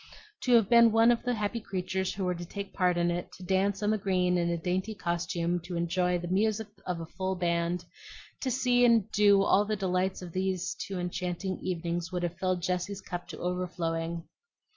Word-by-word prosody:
To 250 - +4
have 225 -4 +5
been 235 0 +7
one 225 +2 +6
of 235 - +1
the 245 -1 -1
happy 215 +2 -2
creatures 190 -2 -2
who 195 - -3
were 180 - +1
to 175 0 -6
take 200 +3 -7
part 180 -2 +2
in 175 0 +2
it, 175 +1 -4
to 185 - -11
dance 195 +2 +1
on 210 - +2
the 215 - +1
green 180 -2 +1
in 170 -1 +1
a 170 - 0
dainty 185 +5 -2
costume 175 0 -1
to 175 +1 -7
the 175 +1 0
music 215 +3 +1 0.2
of 175 -2 -2
a - - -5
full 190 +3 -3
band, 170 0 0 0.5
to 265 - -2
see 250 -1 +3
and 230 -3 +4
do 205 -1 +5
and 195 - +4
enjoy - - 0
all 205 +1 +4
the 215 +1 -1
delights 185 -1 -1
of 175 -2 -8
those 185 -1 -1
two 195 -2 -5
enchanting 180 +1 -3
evenings, 175 0 -3
would 180 -1 -2
have 175 0 -3
filled 185 -2 0
Jessie's 180 +2 -1
cup 175 -2 -6
to - - -8
overflowing. 170 -2 -3
185 Hz, 210 wpm, -29 LUFS, 175-200 Hz, 0.5 s, been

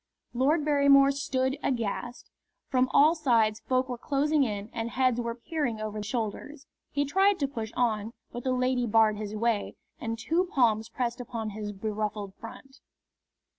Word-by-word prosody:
Lord 290 +5 +2
Barrymore 280 -2 +5
stood 270 0 -1
aghast. 240 0 -3 0.4
From 255 -1 +2
all 300 +3 +5
sides 230 -9 +2
folk 255 0 0
were 245 -2 -5
closing 295 +2 +1
in 210 -3 -4
and 230 0 -3
heads 255 -1 +1
were 235 0 -3
peering 250 -3 -3
over 215 0 -4
shoulders. 235 +6 -4 0.2
He 285 0 0
tried 385 +7 +3
to 280 - 0
push 225 -5 -5
on, 225 -3 0 0.2
but 240 - -6
the 260 - 0
lady 255 -1 +1
barred 215 -1 +4
his 210 0 -5
way 225 -1 0 0.2
and 225 0 -3
two 330 +10 0
palms 225 -4 +3
pressed 240 +1 -3
upon 225 -3 -5
his 210 0 -5
beruffled 210 -1 -4
front. 270 +6 -12
240 Hz, 160 wpm, -28 LUFS, 220-275 Hz, 0.4 s, Barrymore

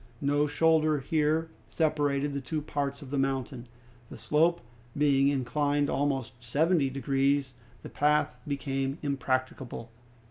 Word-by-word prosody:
No 145 +1 +1
shoulder 155 0 +3
here 155 +3 0 0.2
separated 145 -2 0
the 140 - -3
two 155 +4 -3
parts 145 -1 -3
of 135 - -11
the 140 - 0
mountain. 135 -2 -2 0.4
The - - -9
slope, 155 +8 +2 0.4
being 140 -2 +4
inclined 145 +1 +1
almost 130 -4 -2
seventy 145 +4 +2
degrees, 135 0 0 0.3
the - - -7
path 150 -2 +1
became 135 -1 -2
impracticable. 130 -4 -2
140 Hz, 120 wpm, -29 LUFS, 135-150 Hz, 0.4 s, being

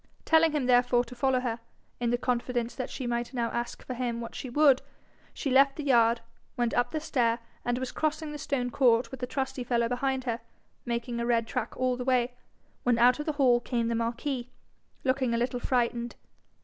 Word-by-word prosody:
Telling 320 0 +5
him 290 -4 0
therefore 245 -1 +4
to 250 - -11
follow 255 +1 +1
her, 235 -2 -2 0.4
in 240 -1 0
the 240 - +2
confidence 245 -1 -1
that 255 -1 -4
she 260 - -5
might 240 +1 -2
now 235 -2 0
ask 240 0 -4
for 255 - -4
him 240 -1 -2
what 230 0 -6
she 260 - -6
would, 275 0 +5 0.5
she 275 - -3
left 275 +1 +5
the 300 - -5
yard, 235 -4 +4 0.4
went 240 -1 0
up 245 0 +2
the 310 - -2
stair, 240 -7 +1 0.3
and 245 0 0
was 260 0 -3
crossing 310 0 -2
the 295 - -6
stone 260 -4 -1
court 240 -1 +3
with 265 - -7
the 250 - -3
trusty 265 -1 -3
fellow 235 -1 +1
behind 260 +2 -1
her, 235 -2 -2 0.5
making 235 0 -2
a 235 - -1
red 230 -1 +2
track 240 -1 -4
all 255 -1 +1
the 250 - -3
way, 250 -1 +1 0.5
when 245 -1 +2
out 245 +3 +5
of 300 - -4
the 310 - +1
hall 255 -4 +4
came 235 -1 -1
the - - 0
marquis, 240 +2 -2 0.5
looking 260 -2 +1
a - - +1
little 245 +1 -1
frightened. 240 -1 0
245 Hz, 210 wpm, -28 LUFS, 235-265 Hz, 0.5 s, Telling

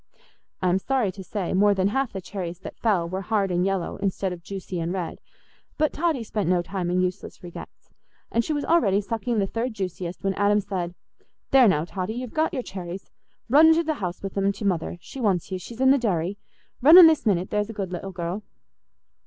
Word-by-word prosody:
I 185 - +3
am 185 +2 +2
sorry 250 -2 0
to 190 +1 -9
say, 190 -1 -3
more 200 +2 +4
than 190 +1 +2
half 270 +2 -1
the 190 - -5
cherries 180 -2 -5
that - - -9
fell 195 -7 +1
were 185 +3 -4
hard 195 -1 0
and 175 0 +1
yellow 195 -2 -1
instead 190 -1 -1
of 175 - -10
juicy 190 -1 -6
and 165 +1 -2
red; 180 -3 -4 0.6
but 305 0 +1
Totty 315 -6 0
spent 210 -5 -2
no 180 -1 +2
time 180 -1 -3
in 180 +1 +1
useless 185 +1 -4
regrets, 175 -1 -11 0.4
and 230 - +2
she 310 - -3
was 290 -1 -1
already 205 - +3
sucking 225 +3 -2
the 200 - +2
third 230 +4 -3
juiciest 180 -2 -5
when 195 0 +1
Adam 205 +1 +3
said, 185 -3 -4 0.6
"There 265 -3 +7
now, 160 -5 +2
Totty, 190 +4 -4
you've 250 -1 -6
got 315 +1 +1
your 260 -4 -3
cherries. 185 -1 -7 0.4
Run 295 +6 +7
into 320 +1 +5
the 315 -1 0
house 180 0 -4
with 195 - -5
'em 195 0 +2
to 205 - -6
Mother—she 175 +6 -3
wants 195 -5 0
you—she's 190 +6 -6
in 265 0 +5
the 275 - +4
dairy. 195 -4 -1 0.4
Run 310 +7 +9
in 365 - +12
this 315 -7 +4
minute—there's 205 +2 0
a - - -5
good 195 -3 -4
little 185 +2 -5
girl." 175 +2 -4
195 Hz, 210 wpm, -25 LUFS, 180-230 Hz, 0.6 s, in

